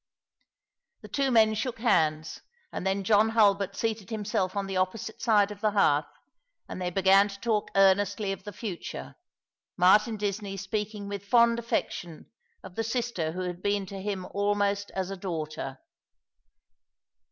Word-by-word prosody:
The - - -10
two 275 -1 0
men 220 -3 +5
shook 230 +3 -3
hands, 155 -9 +1 0.3
and 190 - -4
then 195 +1 0
John 210 +2 +4
Hulbert 200 -3 +3
seated 220 -4 -2
himself 210 -3 -2
on 200 -1 -1
the 195 0 -5
opposite 205 +4 -2
side 210 -3 +3
of 205 0 -9
the 215 - +3
hearth, 155 -8 +3 0.6
and - - -7
they 180 - -1
began 195 +2 +5
to 200 -1 -9
talk 220 -2 0
earnestly 195 +1 +3
of 195 - -6
the 205 - -7
future, 200 -4 -6 0.6
Martin 210 +5 +4
Disney 200 -1 -3
speaking 205 +1 -4
with 200 0 -6
fond 235 0 +4
affection 175 -7 -4 0.3
of - - -10
the 225 - -2
sister 225 -9 -2
who 185 - -4
had 180 -1 -4
been 200 0 0
to 195 0 -8
him 195 -2 -3
almost 200 0 0
as 190 0 -2
a 195 - -5
daughter. 155 -7 -5
200 Hz, 155 wpm, -28 LUFS, 185-215 Hz, 0.6 s, men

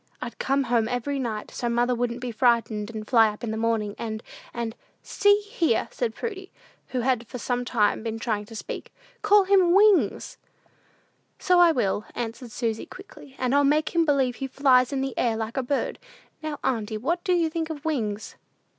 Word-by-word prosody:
I'd 245 -1 -7
come 275 +1 +1
home 235 -3 +1
every 260 +3 -2
night, 220 -5 -4
so 240 - -3
mother 240 +1 +2
wouldn't 240 0 -2
be 250 -1 -3
frightened, 225 -2 +1
and 215 -2 -7
fly 225 -3 +5
up 210 +2 -9
in 225 - -2
the - - -2
morning, 220 -2 0
and 220 -1 -4 0.3
and 235 -1 -4 0.2
" - - -42 0.2
"See 410 0 +5
here," 410 - 0
said 230 -2 -2
Prudy, 390 -4 -6 0.4
who 255 - -2
had 245 -2 0
for 250 - -7
some 245 +1 -2
time 225 -4 +1
been 225 0 -4
trying 220 -3 -2
to 225 - -12
speak; - - -7 0.3
"call 415 -1 +5
him 375 -2 +4
Wings!" 395 - +3 1.0
"So 360 -1 +3
I 345 -1 +7
will," 210 -6 0
answered 235 +1 -5
Susy, 225 -1 -3
quickly, 325 -8 -13
"and 255 0 0
I'll 285 0 +4
make 300 +2 +2
believe 280 -7 +2
he 270 - -3
flies 260 -1 +3
in 275 -1 -1
the 270 -1 -3
air 230 -2 +1
like 220 0 -4
a 265 - +1
bird. 270 +2 -2 0.4
Now, 310 -2 -4
auntie, 220 -4 -1
what 335 +10 -1
do 370 -3 +1
you 335 -2 +1
think 325 0 -3
of 305 -1 -7
Wings?" 220 -9 -2
250 Hz, 195 wpm, -25 LUFS, 225-305 Hz, 1.0 s, I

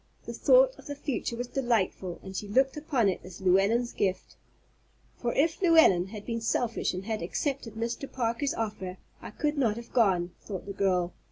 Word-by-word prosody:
The - - -5
thought - - +5
of - - -13
the 285 - -4
future 275 -4 -3
was 245 +1 -3
delightful, 230 -8 -1
and 190 0 -8
she 205 - -4
looked 265 +6 +2
upon 290 -7 +1
it 190 - -1
as 180 -1 -11
Llewellyn's 200 +6 +2
gift. 190 -2 -2 0.8
"For 240 - -1
if 320 +5 +1
Llewellyn 320 - +5
had 210 +1 -9
been 230 -1 -3
selfish 230 +1 0
and 185 +1 -5
had 220 -1 -2
accepted 235 - -3
Mr. 235 +4 -4
Parker's 245 +3 -1
offer, 205 -5 -4 0.2
I - - -7
could 295 +6 -2
not 225 -5 +2
have 235 0 -10
gone," 185 -7 +3
thought 195 -4 -6
the 200 - -6
girl. 180 -3 +1
230 Hz, 185 wpm, -28 LUFS, 190-265 Hz, 0.8 s, thought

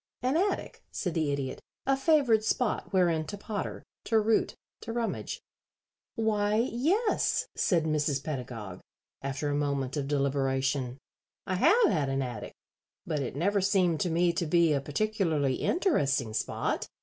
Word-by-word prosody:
"An 255 +3 +1
attic," 385 +5 -1
said 180 -5 -2
the 155 -3 0
Idiot. 140 -2 -3 0.2
"A 270 - +3
favored 270 -6 +3
spot 225 +1 0
wherein 175 -4 +3
to 205 - -5
potter, 205 0 -5 0.2
to 225 - +2
root, 220 +1 +1 0.2
to 230 - -6
rummage." 230 -1 -3 0.8
"Why, 210 -2 +1
yes," 295 - +1
said 170 -4 +2
Mrs. 150 -3 0
Pedagog, 115 - -5 0.4
after 140 +2 -2
a - - 0
moment 140 -2 -1
of 140 -1 -2
deliberation. 135 -2 0 0.5
"I 185 - -2
have 430 - +5
had 150 -7 +1
an 135 0 0
attic, 120 -4 -6 0.5
but 155 -3 -1
it 130 -2 -3
never 200 +7 +1
seemed 185 -5 +2
to 180 - 0
me 170 +1 +2
to 170 - -1
be 170 -1 +4
a 140 - +1
particularly 155 -4 0
interesting 140 - +1
spot. 110 - -1
165 Hz, 150 wpm, -29 LUFS, 140-215 Hz, 0.8 s, have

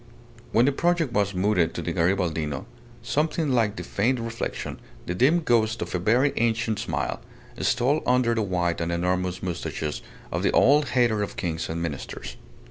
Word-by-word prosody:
When 115 +3 +4
the 140 - +4
project 165 -2 +1
was 100 -3 +1
mooted 90 -3 +2
to - - -3
the 85 - -2
Garibaldino, 85 -5 0 0.4
something 155 0 0
like 110 -4 +2
the - - -5
faint 120 +5 0
reflection, 115 0 -4 0.3
the 90 - -2
dim 140 - +3
ghost 115 -5 +2
of - - -8
a 90 - 0
very 120 +10 +3
ancient 115 -2 +1
smile, - - -2 0.4
stole 135 +5 +2
under 125 -2 +3
the 115 - 0
white 90 -4 0
and 85 +1 -1
enormous 90 +1 -1
moustaches 85 -4 -3 0.3
of - - -1
the - - +2
old 145 +2 +5
hater 115 -4 +3
of 105 - -4
kings 80 -3 -2
and 85 +1 -3
ministers. - - -6
105 Hz, 170 wpm, -25 LUFS, 85-125 Hz, 0.4 s, old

